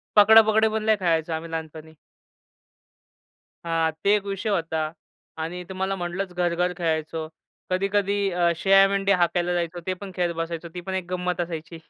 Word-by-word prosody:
पकडा-पकडी 220 +1 +7
पण 220 0 -2
लय 220 0 +4
खेळायचो 165 -2 0
आम्ही 160 +1 -5
लहानपणी. 160 -1 -7 1.7
हां, 165 -1 +1
ते 200 - +4
एक 205 -1 -2
विषय 200 +2 -3
होता 160 -4 -1 0.5
आणि 180 +2 -5
तुम्हाला 190 +1 -2
म्हटलंच 180 +1 -4
घर-घर 175 0 0
खेळायचो. 160 -1 -2 0.4
कधी-कधी 200 +1 +1
अ, 175 -1 +2
शेळ्या-मेंढे 195 +2 +4
हाकायला 175 0 +1
जायचो, 175 0 -2
ते 185 - +1
पण 190 +1 -9
खेळत 175 -2 0
बसायचो. 165 0 -4
ती 180 - -4
पण 190 +2 -5
एक 185 -2 -2
गंमत 180 -1 -1
असायची. 165 -1 -6
180 Hz, 150 wpm, -24 LUFS, 165-195 Hz, 1.7 s, पकडा-पकडी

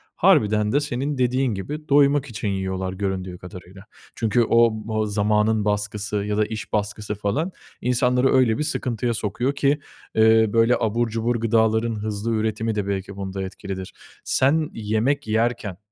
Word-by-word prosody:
harbiden 105 0 +3
de 145 - +3
senin 140 0 -3
dediğin 125 -1 +1
gibi, 150 +11 -6
doymak 140 0 +4
için 110 -5 -5
yiyorlar 95 -1 -2
göründüğü 95 -2 -3
kadarıyla. 90 +2 -12 0.3
Çünkü 115 +1 +2
o 115 0 +4 0.2
b - - -5
o 110 0 0
zamanın 105 +1 +1
baskısı 105 0 -2
ya 105 +1 -2
da 105 - +3
iş 110 0 -7
baskısı 105 0 -2
falan, 135 - -1 0.3
insanları 125 +1 +2
öyle 125 -3 +3
bir 150 - -1
sıkıntıya 120 -6 -1
sokuyor 110 +6 -1
ki, 140 +1 +2 0.4
ııı, 110 -1 +5
böyle 115 +2 +4
abur 115 +1 0
cubur 115 +2 -1
gıdaların 110 0 +1
hızlı 105 +1 -3
üretimi 110 0 -1
de 105 -2 -2
belki 100 0 -3
bunda 95 0 -4
etkilidir. 95 0 -7 0.3
Sen 150 +4 +2
yemek 110 +5 -1
yerken, 110 -4 -1
110 Hz, 155 wpm, -23 LUFS, 105-120 Hz, 0.4 s, ııı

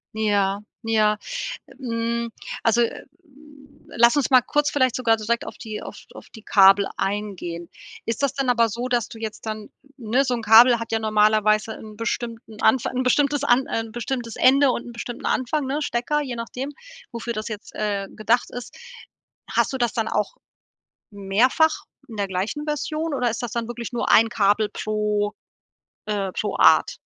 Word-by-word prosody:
Ja, 205 -2 +1 0.2
ja. 215 -2 +2 0.6
Hm, 235 -1 -2 0.3
also, 235 +1 +3 1.0
lass 235 +3 +4
uns 285 - +1
mal 255 -2 +6
kurz 295 +3 0
vielleicht 260 -5 +1
sogar 230 -3 +2
direkt 230 +2 -1
auf - - -9
die 215 -3 -7
auf - - -9 0.2
auf - - -13
die 220 -2 -14
Kabel 195 0 +6
eingehen. 190 -4 -3 0.4
Ist 230 +3 -3
das 280 - 0
dann 270 -2 0
aber 235 -2 +3
so, 240 +4 -4
dass 240 -2 0
du 225 - -11
jetzt 220 0 -7
dann, 215 -1 -6 0.3
ne 245 +3 +1
so 250 -2 0
'n 230 - -5
Kabel 235 +2 +7
hat 230 - -6
ja 225 - +1
normalerweise 215 0 +2
'n 215 -1 -11
bestimmten 230 -1 -5
Anfa 225 +2 +3
'n 255 - -1
bestimmtes 285 +2 +2
an 260 -1 +3
ein 225 -1 -3
bestimmtes 240 0 -4
Ende 275 +2 +5
und 235 - -4
'n 240 - -8
bestimmten 235 0 -7
Anfang, 270 +3 0
ne? 285 +3 -2
Stecker, 290 +3 -1
je 255 -4 -4
nachdem, 250 +4 -5 0.4
wofür 235 0 -4
das 215 -1 -4
jetzt, 215 -1 -8
äh, 200 -2 -2
gedacht 230 +3 +1
ist. 245 -1 -8 0.7
Hast - - +1
du - - -1
das 240 -2 +1
dann 225 -2 -1
auch - - -1 0.8
mehrfach 225 +11 +2 0.3
in 220 - -9
der 200 -1 -1
gleichen 195 +11 -3
Version 305 +1 -2
oder 245 -3 +1
ist 230 - -4
das 240 - -3
dann 235 -2 -2
wirklich 240 0 -6
nur 240 - -2
ein 225 +1 +6
Kabel 210 -1 +2
pro, 210 -1 -1 0.7
äh 200 -3 -2
pro 210 - -2
Art? - - +5
230 Hz, 175 wpm, -23 LUFS, 215-250 Hz, 1.0 s, Kabel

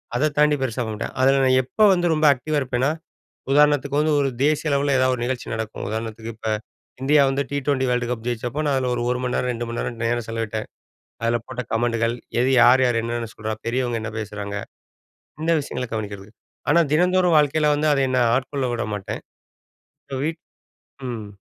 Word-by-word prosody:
அத 150 +5 +2
தாண்டி 150 0 +4
பெருசா 125 -1 -1
பண்ண 110 - -4
மாட்டேன். 105 - -5
அதில 135 +1 +4
நான் 130 0 +4
எப்ப 210 - +3
வந்து 175 -1 0
ரொம்ப 155 0 +1
ஆக்டிவா 150 +4 -3
இருப்பேன்னா, 130 +2 0 0.6
உதாரணத்துக்கு 145 -1 +3
வந்து 155 0 +2
ஒரு 140 - +2 0.2
தேசிய 150 +1 +1
அளவில 140 0 +2
ஏதாவது 130 0 +3
ஒரு 120 - -4
நிகழ்ச்சி 130 -1 -3
நடக்கும். 110 -1 -5
உதாரணத்துக்கு 110 +1 -5
இப்ப 110 0 -3 0.5
இந்தியா 145 +2 +4
வந்து 135 +1 0
டி 145 - -2
20 140 -2 +1
வேர்ல்டு 125 -1 0
கப் 115 -2 -4
ஜெயிச்சப்போ 120 +4 -2
நான் 145 - +2
அதில 130 -1 0
ஒரு 120 - -2
ஒரு 125 - 0
மணி 125 0 -1
நேரம், 125 - 0
2 120 0 -4
மணி 115 - -4
நேரம் 120 - -4
நேரம் 120 0 0
செலவிட்டேன். 110 -1 -3 0.6
அதில 115 +1 +2
போட்ட 125 -1 -4
கமெண்டுகள் 115 0 +1 0.3
எது 130 - +2
யார், 125 +2 +6
யார் 120 -2 +2
என்னென்ன 115 0 -3
சொல்றா, 110 0 -4
பெரியவங்க 120 -1 0
என்ன 110 0 -5
பேசுறாங்க 105 -1 -5 0.9
இந்த 165 +1 +1
விஷயங்கள 125 -3 -4
கவனிக்கிறது. 100 -2 -5 0.4
ஆனா 170 - +5
தினந்தோறும் 180 +1 +3
வாழ்க்கையில 150 +1 +3
வந்து, 150 +1 0
அத 140 - +1
என்ன 130 0 +2 0.2
ஆட்கொள்ள 135 +1 -2
விட 120 - -2
மாட்டேன். 100 -2 -5 0.8
இப்ப 135 - -5
வீட் 160 +1 -3 0.7
ம். 115 -4 -5
125 Hz, 190 wpm, -22 LUFS, 115-145 Hz, 0.9 s, யார்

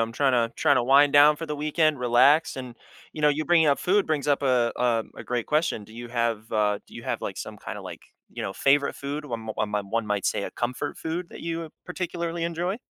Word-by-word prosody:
I'm 115 0 -1
trying 135 +1 +2
to 115 -1 +1
trying 145 -3 +3
to - - +3
wind 140 +3 +5
down 145 +1 +7
for 165 +1 -6
the 150 -1 -4
weekend, 155 -1 +1
relax, 130 +6 +4
and, 125 -2 -7 0.4
you 155 - -7
know, 150 - +6
you 150 +2 0
bringing 165 0 +4
up 140 - +3
food 200 +3 +2
brings 150 -2 -1
up 145 0 +2
uh 125 -3 +2
uh, 120 -2 +1
a - - -8
great 120 -2 -2
question, 150 -8 0
do 110 - -16
you 120 0 -8
have, 115 -2 -2
uh, 105 -2 +1
do - - -17
you - - -8
have, - - -3
like, - - -4
some - - -7
kinda, - - -7
like, - - -9 0.3
you - - -6
know, 95 - -3
favorite 140 +5 +2
food, 145 +2 -5
one 115 -5 -5
m 110 - -10
one 105 -1 -2
m 100 -1 -2
one 115 -1 -1
might 105 -1 -1
say - - 0
a - - -4
comfort 125 +4 -3
food 170 +2 -4
that - - -10
you 165 -1 -4 0.2
particularly 170 -2 -3
enjoy? 175 +4 -2
140 Hz, 250 wpm, -25 LUFS, 115-155 Hz, 0.4 s, down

